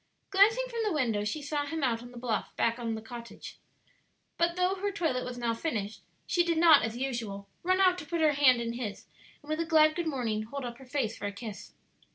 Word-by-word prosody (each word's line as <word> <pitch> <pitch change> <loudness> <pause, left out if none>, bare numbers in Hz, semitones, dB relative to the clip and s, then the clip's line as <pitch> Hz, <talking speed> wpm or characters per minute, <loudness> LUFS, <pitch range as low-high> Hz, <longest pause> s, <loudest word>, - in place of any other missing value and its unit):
Glancing 435 +6 +5
from 470 -2 -5
the 425 - 0
window, 230 -8 0
she 285 +8 -3
saw 290 0 -1
him 320 0 -3
out 230 -3 +1
on 245 - -10
the 245 - -12
bluff 235 -2 -2
back 230 +1 +1
of 230 -2 -2
the 220 - -7
cottage; 235 +1 -9 0.8
but 340 0 +1
though 365 +1 +2
her 400 +1 -2
toilet 320 -10 -1
was 250 0 -6
now 235 -1 0
finished, 220 -5 -3 0.2
she 350 - +2
did 340 -1 0
not, 320 -3 +7
as 225 +1 -3
usual, 230 -7 -4
run 370 +2 +2
out 365 -1 +4
to 300 - -8
put 340 - -2
her 310 -1 +5
hand 265 -4 +5
in 230 0 -2
his, 235 -4 -5 0.4
and 290 - -15
with 310 - -1
a - - +2
glad 310 -2 +5
good 345 -2 -2
morning 235 -7 -1
hold 255 +5 -6
up 240 0 -7
her 265 - -13
face 250 -5 -1
for - - -4
a - - -3
kiss. 210 0 -8
265 Hz, 235 wpm, -30 LUFS, 230-330 Hz, 0.8 s, not